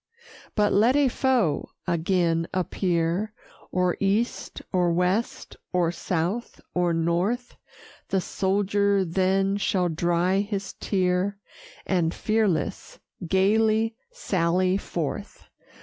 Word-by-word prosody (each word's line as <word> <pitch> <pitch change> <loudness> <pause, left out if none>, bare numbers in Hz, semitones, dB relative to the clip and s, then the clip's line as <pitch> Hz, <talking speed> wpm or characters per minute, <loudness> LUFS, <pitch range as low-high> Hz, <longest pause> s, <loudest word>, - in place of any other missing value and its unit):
But 210 -1 +3
let 230 +6 +4
a 285 -2 +4
foe 245 - +1 0.2
again 170 -1 +1
appear, 180 +2 0 0.4
Or 180 -1 +1
east, 205 +5 -1
or 180 -2 +3
west, 180 +6 -1
or 175 -2 +2
south, 180 +6 -2
or 175 -1 +1
north; 175 +9 0 0.5
The 195 - +1
soldier 200 +1 +1
then 195 +3 +1
shall 190 -3 +1
dry 175 +3 +1
his 200 -1 -3
tear, 185 +1 0 0.5
And 175 -3 +1
fearless, 215 -7 -1 0.3
gayly 220 +4 +2
sally 185 - +1
forth. 200 - -4
190 Hz, 100 wpm, -25 LUFS, 175-205 Hz, 0.5 s, let